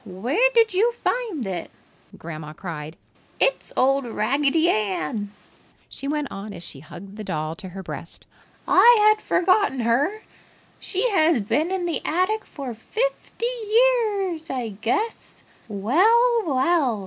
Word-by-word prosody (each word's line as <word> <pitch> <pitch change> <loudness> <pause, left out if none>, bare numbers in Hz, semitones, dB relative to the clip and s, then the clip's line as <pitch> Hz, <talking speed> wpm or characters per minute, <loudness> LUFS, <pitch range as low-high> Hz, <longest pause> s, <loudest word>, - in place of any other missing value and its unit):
Where 245 - +1
did 455 -3 +4
you 450 +6 +2
find 465 - -2
it?" 180 -3 -4 0.5
Grandma 155 -2 -8
cried. 155 -2 -7 0.4
"It's - - +1
old 270 +2 +3
Raggedy 275 +8 +1
Ann!" 205 - -1 0.6
she 275 - -6
went 295 -1 -2
on 200 +1 -7
as 175 -2 -9
she 140 - -7
hugged 185 +7 -12
the 215 - -6
doll 155 -3 -3
to 190 -3 -9
her 190 +1 -8
breast. - - -9 0.4
"I 480 0 +7 0.2
had 430 - -14
forgotten 370 - +2
her. 285 - 0 0.6
She 390 +6 -1
has 315 - +3
been 305 - 0
in 375 -2 -2
the 340 - -2
attic 370 +6 0
for 270 -5 -7
fifty 465 - -3
years, 435 -7 +1
I 250 -4 -3
guess! 235 - -3 0.2
Well! 425 - +3
Well! 265 -4 +2
280 Hz, 135 wpm, -23 LUFS, -, 0.6 s, I